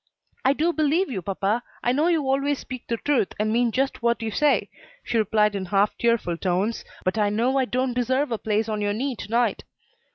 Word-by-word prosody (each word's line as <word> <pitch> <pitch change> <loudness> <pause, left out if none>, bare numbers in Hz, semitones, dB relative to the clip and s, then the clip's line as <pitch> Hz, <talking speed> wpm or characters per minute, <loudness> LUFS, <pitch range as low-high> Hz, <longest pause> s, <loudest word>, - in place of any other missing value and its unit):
"I 265 - +4
do 330 +4 +1
believe 310 +2 +1
you, 195 -6 -3
papa; 200 +5 -1 0.2
I 245 - +2
know 295 +6 +2
you 330 -4 +2
always 275 +1 +1
speak 255 -2 -8
the 230 - -1
truth 270 -5 0
and 215 +1 +1
mean 240 0 +2
just 270 +2 -1
what 235 0 +1
you 220 - -2
say," 295 +7 +2 0.4
she 230 - 0
replied 210 0 +2
in 190 -1 -3
half 200 +2 +2
tearful 230 -8 +1
tones, 190 +6 -1 0.2
"but 185 +4 0
I 205 -1 +3
know 240 +6 +1
I 260 - +2
don't 255 0 -1
deserve 260 +3 0
a 225 - -1
place 215 0 0
on 215 -1 -2
your 205 0 0
knee 260 +4 -2
to - - -8
night." 235 +1 +1
235 Hz, 220 wpm, -24 LUFS, 210-270 Hz, 0.4 s, I